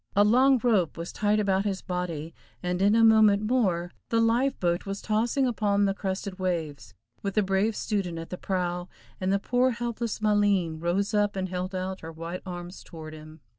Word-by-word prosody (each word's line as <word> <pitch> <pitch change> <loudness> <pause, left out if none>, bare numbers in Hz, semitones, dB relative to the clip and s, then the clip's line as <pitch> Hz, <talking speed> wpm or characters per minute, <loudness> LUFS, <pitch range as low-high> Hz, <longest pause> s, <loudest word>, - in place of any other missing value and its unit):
A 205 - +6
long 255 +5 +5
rope 205 -11 +2
was 170 +1 -6
tied 210 0 +1
about 195 -2 +1
his 195 -2 -2
body, 170 -3 -4 0.3
and 180 +1 -1
in 205 +2 +4
a 230 - +5
moment 215 -2 +6
more 190 -7 +1 0.2
the 230 - +2
life 240 +4 +2
boat 175 +1 0
was 195 0 -3
tossing 230 +5 +1
upon 205 -4 +1
the 195 - +1
crested 190 0 -4
waves, 165 -6 -3 0.3
with 200 -1 -3
the 215 - +3
brave 195 +3 +1
student 195 -6 -2
at 165 0 -7
the 180 - -4
prow, 180 -1 -2 0.3
and 185 0 0
the 200 - +3
poor 250 +5 +2
helpless 235 -1 -3
Maleen 205 -6 +2
rose 190 +6 0
up 205 -1 +2
and 185 -1 -2
held 185 +1 -4
out 185 +1 -4
her 165 - -7
white 165 +3 -6
arms 175 0 -7
toward 160 -2 -10
him. 155 0 -12
195 Hz, 195 wpm, -27 LUFS, 175-215 Hz, 0.3 s, A